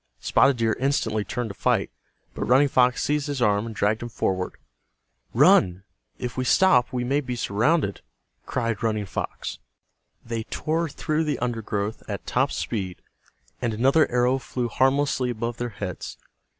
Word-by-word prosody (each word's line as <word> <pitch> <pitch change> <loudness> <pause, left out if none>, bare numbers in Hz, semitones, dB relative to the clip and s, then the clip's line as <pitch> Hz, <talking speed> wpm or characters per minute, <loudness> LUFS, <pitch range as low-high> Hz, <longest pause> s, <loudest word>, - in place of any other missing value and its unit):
Spotted 135 -2 +3
Deer 115 -1 +1
instantly 115 -6 0
turned 120 0 -3
to - - -7
fight, - - 0 0.4
but - - -3
Running 135 +4 +5
Fox 125 -1 +3
seized 150 0 0
his 145 -2 -3
arm 105 -2 +2
and 110 - -7
dragged 105 +2 +1
him 120 - -5
forward. 95 -3 -1 0.8
"Run! 90 +1 +4 0.3
If 125 -2 -5
we 130 - 0
stop 125 -3 +4
we 125 -1 -1
may 140 +4 +1
be 125 -3 -4
surrounded!" 120 - +1 0.5
cried 115 -4 -1
Running 110 -2 0
Fox. 95 - -5 0.7
They 115 -1 -3
tore 165 +1 -1
through 155 +3 -1
the 145 -4 -1
undergrowth 110 -3 -3
at - - -5
top - - +1
speed 95 -5 -3 0.6
and 115 -3 -1
another 135 +7 +4
arrow 125 +2 +2
flew 125 -1 -3
harmlessly 135 +1 +2
above 120 0 -3
their 120 0 -3
heads. 100 -4 -6
120 Hz, 155 wpm, -25 LUFS, 110-135 Hz, 0.8 s, Running